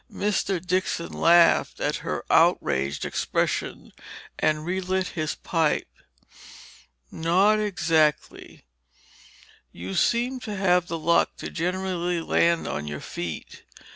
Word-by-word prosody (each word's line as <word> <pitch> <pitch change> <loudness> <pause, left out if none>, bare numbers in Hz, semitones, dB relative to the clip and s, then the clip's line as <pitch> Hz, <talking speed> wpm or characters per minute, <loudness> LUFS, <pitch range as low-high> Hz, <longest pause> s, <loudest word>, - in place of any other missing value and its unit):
Mr. 200 -2 -1
Dixon 180 -1 -2
laughed 170 0 +4
at - - -1
her - - -5
outraged 70 +2 +2
expression, - - -2 0.5
and 155 0 0
relit 185 +1 -1
his 155 -3 -3
pipe. 165 -3 0 1.2
"Not 190 +6 +2
exactly—you 160 -7 0 1.3
seem 245 - +1
to 215 -4 -6
have 180 -2 +2
the 165 - -3
luck 170 +1 +2
to - - -7
generally 180 0 -2
land 170 +1 +1
on 75 - -4
your 75 0 -5
feet. 85 -3 -7
175 Hz, 105 wpm, -25 LUFS, 160-190 Hz, 1.3 s, laughed